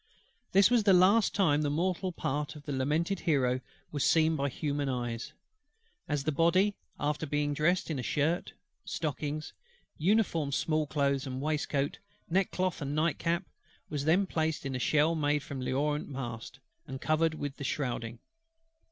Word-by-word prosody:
This 195 +4 +5
was 240 -2 +5
the 200 -2 +5
last 195 +5 +5
time 155 -7 +3
the 145 - +1
mortal 180 +4 0
part 145 -2 -3
of 150 - -11
the 145 - -5
lamented 155 +8 0
Hero 130 -5 +1 0.3
was 145 -2 -1
seen 160 0 +4
by 140 -1 0
human 145 +1 -2
eyes; 120 -2 -3 0.8
as 145 -2 0
the 155 - 0
Body, 170 +7 +3 0.3
after 150 +2 -1
being 145 0 0
dressed 165 +4 +1
in 145 - -2
a - - -1
shirt, 155 +7 0 0.3
stockings, 150 0 -3 0.5
uniform 165 -5 +2
small 155 +1 +1
clothes 140 -1 0
and 130 0 -4
waistcoat, 145 -1 -1 0.3
neckcloth, 185 -1 0
and 140 +1 -2
night 155 0 +1
cap, 170 +2 0 0.5
was 145 -2 -2
then 175 +5 +4
placed 160 -4 -1
in 135 - -2
the 130 - -2
shell 155 +5 +3
made 150 -2 +1
from 140 -2 -6
L'Orient's 145 +4 -1
mast, 120 -2 -6 0.3
and 135 -2 -6
covered 155 +2 +1
with 145 -2 -5
the - - -6
shrouding. 120 -4 -2
150 Hz, 160 wpm, -30 LUFS, 140-165 Hz, 0.8 s, This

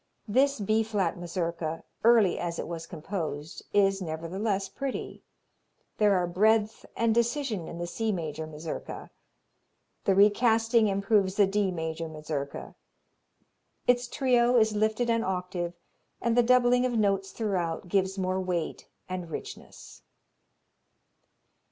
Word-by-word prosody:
This 270 +5 +2
B 215 +2 +2
flat 205 -6 -1
Mazurka, 170 -2 -3 0.2
early 225 -5 +5
as 170 -1 -3
it - - -4
was 165 0 -6
composed, 160 -3 -5
is, 195 -1 +3
nevertheless, 190 +5 -2
pretty. 270 +6 -5 0.8
There 205 -2 +5
are 180 -1 +2
breadth 215 +5 +2
and 230 -1 +2
decision 235 - 0
in 170 - -7
the 175 - -3
C 220 +5 -2
major 160 -4 -4
Mazurka. 155 +1 -7 0.9
The 195 - +3
recasting 225 +2 +4
improves 200 -1 +1
the 205 - +5
D 200 0 +1
major 160 -2 -3
Mazurka. 150 -2 -5 1.1
Its 245 0 +3
trio 245 -1 +3
is 220 -2 +3
lifted 220 +3 +1
an 230 0 +1
octave 180 -2 -3 0.4
and 235 -1 0
the 245 - +6
doubling 245 0 +4
of 245 -2 0
notes 195 -2 +1
throughout 185 -6 -2
gives 190 +1 0
more 185 0 0
weight 175 -3 -3 0.2
and 185 -2 -5
richness. - - -9
195 Hz, 125 wpm, -28 LUFS, 170-225 Hz, 1.1 s, the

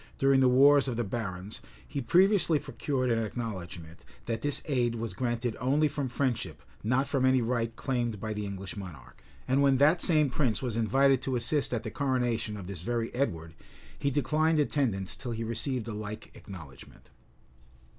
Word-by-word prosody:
during 135 0 +4
the 130 -1 +5
wars 140 +2 +6
of 120 -3 -2
the 120 - +1
barons, 100 -2 -5 0.3
he 140 - -3
previously 180 - +4
procured 140 -3 -2
an 115 0 +1
acknowledgment, 90 -8 -6 0.2
that 115 -1 -2
this 145 +1 +1
aid 120 -5 +1
was 115 -1 -4
granted 120 -2 -2
only 140 +5 +2
from 140 -3 -3
friendship, 125 -2 -2 0.2
not 125 +5 +1
from 140 -2 0
any 130 0 +4
right 115 -1 -1
claimed 120 -5 -2
by 110 +2 -3
the 105 0 -4
English 95 -1 -6
monarch;[] 80 -11 -10 0.2
and 130 +2 +3
when 135 -1 +4
that 155 +6 +4
same 155 -6 +3
prince 120 -5 +1
was 125 -4 -3
invited 135 +4 +3
to 130 -1 -2
assist 130 +5 +1
at 120 -3 -2
the - - -5
coronation 125 -6 -1
of 95 - -7
this 90 -3 -7
very 115 +3 -2
Edward, 85 -11 -2 0.5
he 140 - +1
declined 155 +4 +1
attendance 125 -10 0
till 125 -3 -5
he 115 0 -3
received 115 +1 -2
a 115 - -4
like 105 +1 -7
acknowledgment. 80 -9 -12
120 Hz, 175 wpm, -29 LUFS, 110-135 Hz, 0.5 s, wars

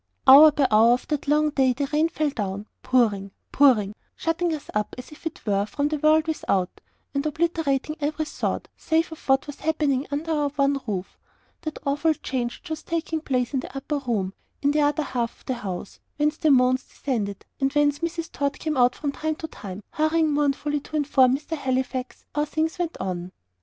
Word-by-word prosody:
Hour 295 +4 +10
by 285 -2 +2
hour 225 +3 +6
of 250 - -2
that 300 -2 -2
long 300 +1 +3
day 265 -3 +3
the 280 +3 -2
rain 310 +2 +3
fell 305 -3 -1
down 205 -4 -4 0.2
pouring, 210 -6 +2 0.2
pouring 230 -8 +4 0.2
shutting 335 +1 0
us 310 -3 -5
up, 210 0 -1
as 250 - -9
it 315 +1 -7
were, 200 -2 +2
from 285 +5 -1
the 305 -1 -2
world 310 +1 +4
without, 195 - -1 0.3
and 280 0 0
obliterating 310 -2 0
every 310 +1 -1
thought, - - -3
save 325 +1 0
of 320 - -11
what 270 0 +4
was 290 - -9
happening 295 -4 0
under 295 +3 -2
our 295 -2 +1
one 275 -1 +2
roof 190 -3 -4 0.4
that 310 -2 -5
awful 295 +3 +2
change 245 -4 -3
which 355 - -10
was 315 - -3
taking 325 -1 -2
place 255 -3 -1
in 270 - +1
the 265 - -7
upper 285 +2 -2
room, 215 -8 -2 0.3
in 285 - +4
the 300 +1 +2
other 295 +1 +2
half 240 -4 -3
of - - -25
the 260 - -1
house, 200 -5 -6 0.2
whence 300 +1 +2
the 315 - +2
moans 255 -1 +4
descended, 210 -7 -4
and 270 0 +1
whence 290 -1 +2
Mrs. 335 0 -3
Tod 280 0 -1
came 310 -3 -2
out 245 0 +4
from 285 - -2
time 315 +2 -2
to 320 - -6
time, 200 -7 -9
hurrying 315 0 +2
mournfully 295 0 0
to 305 - -9
inform 270 -3 +4
"Mr. 305 +3 -5
Halifax" 260 -2 -3
how 295 0 +1
things 320 +3 -2
went 340 -2 -2
on. 180 -1 -4
285 Hz, 200 wpm, -25 LUFS, 250-310 Hz, 0.4 s, Hour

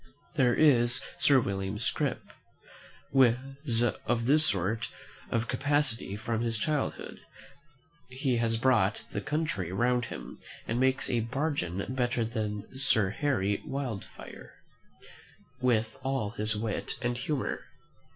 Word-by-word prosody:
There 130 -6 +3
is 120 -6 +4 0.2
Sir 140 -2 +6
William 95 -2 -2
Scrip 115 - 0 0.9
was 130 -1 +3
of 120 -1 0
this 150 +4 +5
sort 105 +3 0 0.4
of 115 0 0
capacity 135 -6 0
from 110 +1 -2
his 115 -1 -1
childhood; 150 +2 -2 0.9
he 130 -1 0
has 115 -1 +1
brought 115 -5 +2
the - - -3
country 130 - -2
round 120 +4 +1
him, - - -8 0.3
and 115 +2 -1
makes 130 0 +2
a 120 - +1
bargain 115 - -2
better 125 -2 0
than 110 +1 -4
Sir 110 -8 +3
Harry 105 -6 0
Wildfire, 130 -7 -6 1.1
with 115 -3 +1
all 130 -5 -1
his 110 -1 -1
wit 105 0 -2
and 120 0 0
humour. 145 +2 -2
120 Hz, 120 wpm, -29 LUFS, 110-130 Hz, 1.1 s, Sir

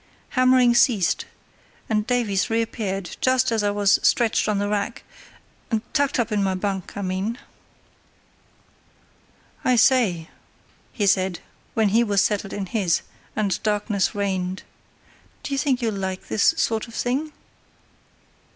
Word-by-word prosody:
Hammering 255 -1 +4
ceased, 230 -6 +2 0.6
and 215 0 0
Davies 230 -6 0
reappeared 220 -4 -2
just 255 -1 +2
as 225 -1 +1
I 205 - +1
was 205 -1 +3
stretched 230 -2 +2
on 210 - +1
the 205 0 0
rack—tucked 230 +5 -4
up 235 -1 0
in 210 -1 +1
my 190 -1 0
bunk, 190 0 -4
I 200 - -3
mean. 190 +5 -2 2.3
"I 255 - +3
say," 225 -9 +3 0.6
he 210 - -1
said, 190 -2 +2 0.4
when 220 -2 +3
he 225 +4 +3
was 200 -3 +2
settled 200 -2 -1
in 200 - -4
his, 185 -3 0 0.3
and 200 -4 -1
darkness 210 -2 0
reigned, 190 -2 -2 0.8
"do 280 - -4
you 275 - 0
think 270 -4 0
you'll 225 -2 0
like 190 -1 -5
this 220 +10 +3
sort 225 -6 0
of 230 - -12
thing?" 275 +6 -1
210 Hz, 135 wpm, -23 LUFS, 195-240 Hz, 2.3 s, Hammering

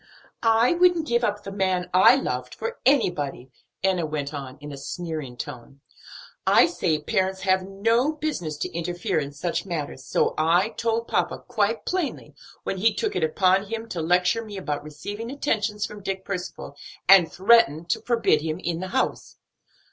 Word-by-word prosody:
"I 225 +3 +4
wouldn't 350 -2 +3
give 235 -4 +1
up 205 -2 -1
the 195 - -7
man 185 -2 0
I 185 +7 +7
loved 125 - -3
for 470 +1 -5
anybody," 145 - +1 0.3
Enna 190 -3 +2
went 150 -1 -4
on 135 -2 -7
in 145 0 -8
a - - -6
sneering 155 -4 -5
tone. 135 +1 -8 0.7
"I - - +7
say 155 - 0
parents 190 +3 -1
have 190 -1 +2
no 230 +8 +1
business 285 - -3
to - - -3
interfere 175 +2 -1
in 140 -1 -4
such 160 +4 -2
matters; 160 -8 -4
and - - -15
so - - +1
I 175 +6 +3
told 230 0 -2
papa - - -1
quite 215 +2 0
plainly 365 -5 -3 0.3
when 195 - -3
he 220 +2 +3
took - - -2
it 180 - 0
upon 185 +5 +2
him 225 +2 -5
to 170 - -3
lecture 180 +7 +2
me 210 -2 -8
about 150 -7 -3
receiving 205 +9 -7
attentions 215 -7 -1
from 210 -1 -9
Dick 190 -1 -4
Percival, 180 -6 -6 0.3
and 185 -4 +7
threatened 185 -6 +4
to - - 0
forbid 230 -10 +2
him 155 0 -3
the 175 0 -3
house." 260 +7 -2
190 Hz, 170 wpm, -25 LUFS, 155-225 Hz, 0.7 s, I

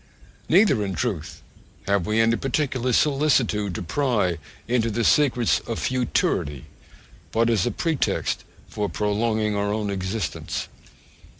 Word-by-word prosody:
Neither, 170 - +4
in 95 -2 -3
truth, 100 -11 -3 0.4
have 100 -3 +1
we 110 +1 +1
any 115 +1 +4
particular 130 -1 -1
solicitude 125 - +2
to - - -4
pry 100 - 0 0.3
into 115 -1 +1
the 115 +2 -1
secrets 125 -4 +3
of 115 - -3
futurity, 115 - -1 0.7
but 115 +1 +2
as 110 -1 +2
a - - 0
pretext 165 -5 -1 0.2
for 105 -1 -3
prolonging 105 0 0
our 100 0 0
own 105 -1 -1
existence. 95 -3 -3
115 Hz, 125 wpm, -24 LUFS, 100-125 Hz, 0.7 s, Neither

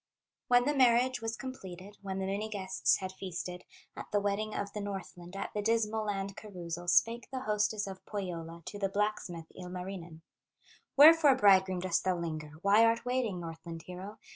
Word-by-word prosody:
When 245 0 +5
the 295 - +2
marriage 250 -1 +4
was 225 0 -3
completed, 200 -7 -8
When 190 -1 -4
the 190 - -2
many 200 +3 -2
guests 190 -10 +1
had 185 -1 -5
feasted, 180 -1 -6 0.3
At - - -7
the 205 - +3
wedding 205 +2 -1
of 200 0 -3
the 210 - -4
Northland, 190 -3 -7
At 195 - -4
the 210 - -1
Dismal 220 0 +1
land 195 -1 -2
carousal, 175 -4 -7
Spake 230 +7 +3
the 260 -1 -4
hostess 210 -1 0
of 190 -1 -8
Pohyola 170 -4 -5
To 205 - -7
the 195 -1 0
blacksmith, 195 -5 -2
Ilmarinen: 180 -2 -7 0.8
"Wherefore, 300 -1 +9
bridegroom, 190 -5 +4
dost 185 -2 0
thou 185 -1 +1
linger, 155 -3 -5
Why 205 +3 +6
art 230 +1 +3
waiting, 245 -7 0
Northland 165 0 -7
hero? 185 +5 -8
195 Hz, 170 wpm, -32 LUFS, 180-220 Hz, 0.8 s, Wherefore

